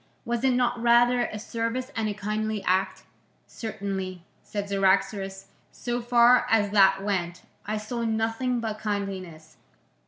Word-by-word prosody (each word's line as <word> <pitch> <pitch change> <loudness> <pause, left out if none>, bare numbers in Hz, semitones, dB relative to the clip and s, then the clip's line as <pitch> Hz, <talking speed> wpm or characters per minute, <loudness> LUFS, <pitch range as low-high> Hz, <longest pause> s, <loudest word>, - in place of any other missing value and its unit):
Was 235 +1 -2
it 265 -1 +4
not 245 -1 +1
rather 240 +1 +4
a 215 - -5
service 230 +4 -3
and 220 -1 -1
a 205 - -4
kindly 215 0 -2
act?" 190 +1 0 0.4
"Certainly," 190 -5 -5 0.2
said 205 -1 -5
Cyaxares, 195 0 0 0.3
"so 240 0 -3
far 240 +1 +5
as 205 -2 +3
that 195 -1 +5
went, 180 -4 -2 0.2
I 215 +1 -1
saw 230 +3 -4
nothing 225 +3 0
but 220 -2 -4
kindliness." 190 -6 -5
215 Hz, 135 wpm, -26 LUFS, 195-235 Hz, 0.4 s, far